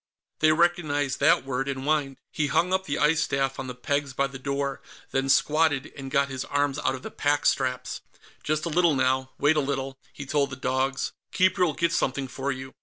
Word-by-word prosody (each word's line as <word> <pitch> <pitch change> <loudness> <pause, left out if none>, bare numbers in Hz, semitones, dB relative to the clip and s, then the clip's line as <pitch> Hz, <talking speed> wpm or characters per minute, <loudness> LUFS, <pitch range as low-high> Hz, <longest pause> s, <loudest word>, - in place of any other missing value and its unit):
They 155 0 +5
recognized 155 -5 +1
that - - +4
word, 135 0 -2
and 135 -1 -3
whined. 145 -2 0
He 150 - 0
hung 170 +5 +1
up 190 0 +1
the 140 - -2
ice 150 +1 +3
staff 135 -1 -1
on 135 - -4
the 125 - -6
pegs 140 +2 -2
by 140 - +1
the 135 -1 -7
door, 140 0 -2 0.3
then 135 0 0
squatted 150 0 +2
and 135 -2 -7
got 140 +1 +2
his 130 -1 -4
arms 145 -1 0
out 130 - 0
of 130 - -10
the - - -7
pack 145 0 0
straps. 130 -1 0 0.4
"Just 155 +1 -1
a - - -1
little 170 -1 +3
now; 130 0 +1
wait 145 +2 +3
a - - +5
little," 135 -1 -3
he 140 +1 -8
told 140 0 +1
the 130 - -6
dogs. 130 +1 -1 0.2
"Keeper'll 185 -3 +2
get 170 -1 +1
something 135 -2 0
for 135 +2 -3
you." 130 0 -7
140 Hz, 210 wpm, -26 LUFS, 135-150 Hz, 0.4 s, They